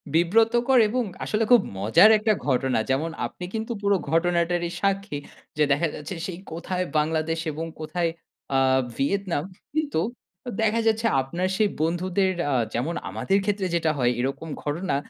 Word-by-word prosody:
বিব্রতকর 225 Hz, +9 st, +3 dB
এবং 250 Hz, +2 st, 0 dB, 0.2 s
আসলে 215 Hz, +1 st, 0 dB
খুব 245 Hz, -, +8 dB, 0.2 s
মজার 110 Hz, -, +6 dB
একটা 215 Hz, 0 st, +2 dB
ঘটনা। 130 Hz, -3 st, +1 dB
যেমন 145 Hz, +5 st, +1 dB, 0.2 s
আপনি 180 Hz, -, -7 dB
কিন্তু 225 Hz, +1 st, -3 dB
পুরো 200 Hz, 0 st, +3 dB, 0.2 s
ঘটনাটারই 170 Hz, +1 st, +1 dB
সাক্ষী। 195 Hz, -5 st, 0 dB, 0.4 s
যে 150 Hz, -, +4 dB
দেখা 160 Hz, +4 st, +3 dB
যাচ্ছে 150 Hz, +5 st, -6 dB
সেই 180 Hz, -1 st, -6 dB
কোথায় 180 Hz, +2 st, -3 dB
বাংলাদেশ 160 Hz, +1 st, 0 dB
এবং 160 Hz, +3 st, -4 dB
কোথায় 170 Hz, +2 st, -1 dB, 0.5 s
আ -, -, +5 dB, 0.4 s
ভিয়েতনাম। 175 Hz, +1 st, 0 dB, 0.3 s
কিন্তু 305 Hz, -, 0 dB, 0.5 s
অ -, -, -1 dB
দেখা 225 Hz, +1 st, +2 dB
যাচ্ছে 225 Hz, +1 st, +2 dB, 0.2 s
আপনার 170 Hz, +8 st, -2 dB
সেই 215 Hz, -2 st, +3 dB
বন্ধুদের, 185 Hz, +3 st, +1 dB, 0.2 s
আ -, -, +1 dB, 0.2 s
যেমন 140 Hz, +9 st, -1 dB
আমাদের 195 Hz, +1 st, 0 dB
ক্ষেত্রে 200 Hz, -2 st, 0 dB
যেটা 165 Hz, -2 st, +2 dB
হয় 125 Hz, -2 st, +2 dB
এরকম 135 Hz, +5 st, -3 dB
ঘটনা, 155 Hz, +2 st, -1 dB
175 Hz, 150 wpm, -25 LUFS, 155-205 Hz, 0.5 s, খুব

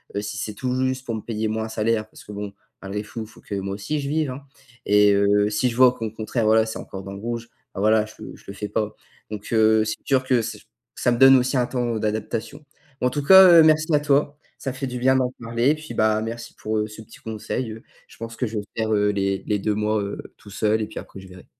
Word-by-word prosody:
heu, 100 Hz, -, 0 dB
si 105 Hz, +1 st, -5 dB
c'est 105 Hz, 0 st, -4 dB
tout 125 Hz, +4 st, -3 dB
juste 130 Hz, 0 st, -1 dB
pour 115 Hz, -, -3 dB
me 110 Hz, -, -5 dB
payer, 110 Hz, 0 st, -3 dB
moi, 110 Hz, 0 st, -2 dB
un -, -, -7 dB
salaire 110 Hz, 0 st, 0 dB
parce -, -, -15 dB
que -, -, -11 dB
bon, 100 Hz, -1 st, -6 dB, 0.3 s
malgré 100 Hz, +2 st, -4 dB
fou, 115 Hz, +2 st, -7 dB
il -, -, -10 dB
faut -, -, -18 dB
que 100 Hz, -, -6 dB
moi 95 Hz, 0 st, -3 dB
aussi 125 Hz, +10 st, -3 dB
je 140 Hz, -1 st, -4 dB
vive, 155 Hz, -2 st, 0 dB
hein 130 Hz, +3 st, -7 dB, 0.5 s
et 105 Hz, 0 st, +5 dB
heu, 100 Hz, +1 st, +3 dB
si 110 Hz, +4 st, +1 dB
je 115 Hz, -, -6 dB
vois 125 Hz, 0 st, +6 dB
qu'au 115 Hz, -3 st, -4 dB
contraire, 110 Hz, +1 st, -2 dB
voilà, 110 Hz, +1 st, +4 dB
c'est 110 Hz, -, -5 dB
encore 95 Hz, 0 st, -8 dB
dans 100 Hz, -, -7 dB
le 100 Hz, -, -8 dB
rouge, 115 Hz, +1 st, -5 dB, 0.3 s
bah, 95 Hz, -, -3 dB
voilà, 110 Hz, +1 st, +4 dB
je 110 Hz, -, -13 dB, 0.2 s
je -, -, -18 dB
le 100 Hz, -, -7 dB
fais 105 Hz, +1 st, -6 dB
pas, 110 Hz, -1 st, -2 dB, 0.4 s
donc 105 Hz, -1 st, -6 dB
heu, 110 Hz, -1 st, +4 dB
c'est 110 Hz, -, -2 dB
sûr 130 Hz, -2 st, +2 dB
que 130 Hz, -2 st, +2 dB
ç 110 Hz, -2 st, -7 dB, 0.3 s
ça 120 Hz, -, +1 dB
me 120 Hz, -, +1 dB
donne 135 Hz, +1 st, +8 dB
aussi 130 Hz, +2 st, +1 dB
un 125 Hz, -1 st, +1 dB
temps 120 Hz, -3 st, -1 dB
d'adaptation. 110 Hz, +6 st, -3 dB, 0.4 s
Mais 125 Hz, -, +3 dB
en -, -, +2 dB
tout 145 Hz, +3 st, -3 dB
cas, 190 Hz, +4 st, +9 dB
heu, -, -, +8 dB
merci 155 Hz, 0 st, +4 dB
à 150 Hz, -, +5 dB
toi. 145 Hz, 0 st, +1 dB, 0.2 s
Ça 135 Hz, -, -4 dB
fait 135 Hz, +1 st, -4 dB
du 125 Hz, 0 st, -5 dB
bien 130 Hz, +1 st, +3 dB
d'en 130 Hz, -1 st, +1 dB
parler 115 Hz, +4 st, +1 dB
et -, -, +1 dB
puis, 155 Hz, 0 st, -9 dB
bah, 110 Hz, 0 st, +2 dB
merci 115 Hz, +1 st, -6 dB
pour, 110 Hz, 0 st, -3 dB
heu, 105 Hz, -, -1 dB
ce 110 Hz, +1 st, -11 dB
petit 110 Hz, -, -15 dB
conseil, 110 Hz, +2 st, -4 dB
heu. 110 Hz, -, -12 dB, 0.2 s
Je -, -, -17 dB
pense 115 Hz, 0 st, -8 dB
que 125 Hz, -, -1 dB
je 110 Hz, 0 st, -5 dB
vais -, -, -6 dB
faire, 110 Hz, -1 st, 0 dB
heu, 105 Hz, -1 st, +2 dB
les 100 Hz, -1 st, -1 dB
les 105 Hz, -1 st, 0 dB
2 105 Hz, +2 st, 0 dB
mois, 105 Hz, 0 st, 0 dB
heu, 100 Hz, 0 st, -4 dB, 0.2 s
tout 105 Hz, -, -15 dB
seul 105 Hz, +3 st, +1 dB
et 105 Hz, -, -2 dB
puis -, -, -7 dB
après -, -, -11 dB
je 95 Hz, -, -12 dB
verrai. 90 Hz, 0 st, -14 dB
110 Hz, 280 wpm, -23 LUFS, 105-125 Hz, 0.5 s, cas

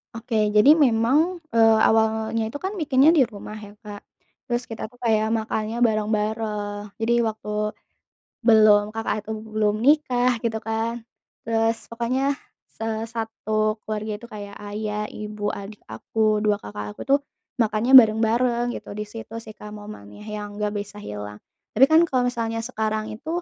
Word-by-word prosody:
Oke, 220 Hz, -2 st, 0 dB
jadi 270 Hz, +8 st, +8 dB
memang, 290 Hz, +5 st, +3 dB, 0.2 s
eee, 225 Hz, -1 st, +5 dB
awalnya 220 Hz, 0 st, +1 dB
itu 285 Hz, -, -6 dB
kan 380 Hz, +6 st, -4 dB
bikinnya 285 Hz, 0 st, +4 dB
di 300 Hz, -, +5 dB
rumah 210 Hz, 0 st, -9 dB
ya 205 Hz, -, -12 dB
Kak, 205 Hz, -2 st, -10 dB, 0.5 s
terus 240 Hz, +1 st, 0 dB
kita 220 Hz, -1 st, -6 dB
tuh 245 Hz, -, -22 dB
kayak 220 Hz, -1 st, +2 dB
makannya 220 Hz, +1 st, -3 dB
bareng-bareng. 210 Hz, -1 st, -1 dB, 0.2 s
Jadi 225 Hz, +1 st, +1 dB
waktu, 220 Hz, -2 st, -3 dB, 1.0 s
belum, 215 Hz, -2 st, +6 dB
kakak 225 Hz, -, -1 dB
tuh 220 Hz, -, -3 dB, 0.2 s
belum 210 Hz, -1 st, +1 dB
nikah 255 Hz, -4 st, +3 dB
gitu 225 Hz, -1 st, 0 dB
kan, 225 Hz, +1 st, -2 dB, 0.4 s
terus 225 Hz, 0 st, +1 dB, 0.2 s
pokoknya 240 Hz, +3 st, -1 dB, 0.5 s
se 225 Hz, -, -5 dB, 0.3 s
satu 215 Hz, -1 st, -1 dB
keluarga 215 Hz, 0 st, -3 dB
itu 235 Hz, +3 st, -12 dB
kayak 205 Hz, -1 st, -8 dB
ayah, 210 Hz, 0 st, -3 dB
ibu, 210 Hz, 0 st, -7 dB, 0.2 s
adik 200 Hz, +1 st, -10 dB
aku, 215 Hz, -1 st, 0 dB
2 210 Hz, -1 st, +3 dB
kakak 105 Hz, -, -7 dB
aku -, -, -13 dB
tuh 280 Hz, -, +6 dB, 0.4 s
makannya 225 Hz, +3 st, +1 dB
bareng-bareng 235 Hz, +2 st, +1 dB
gitu -, -, -8 dB
di 210 Hz, -, -3 dB
situ 225 Hz, +1 st, -10 dB
sih 215 Hz, -, -10 dB
Kak 210 Hz, -, -11 dB
momennya 205 Hz, -, -11 dB
yang 210 Hz, -1 st, -6 dB
nggak 210 Hz, 0 st, -1 dB
bisa 205 Hz, +1 st, -9 dB
hilang. 105 Hz, 0 st, -7 dB, 0.4 s
Tapi 265 Hz, -, +8 dB
kan 315 Hz, +3 st, +5 dB
kalau 255 Hz, -2 st, +1 dB
misalnya 225 Hz, -1 st, -3 dB
sekarang 220 Hz, -2 st, -2 dB
itu, 220 Hz, +8 st, -10 dB
220 Hz, 155 wpm, -23 LUFS, 210-235 Hz, 1.0 s, jadi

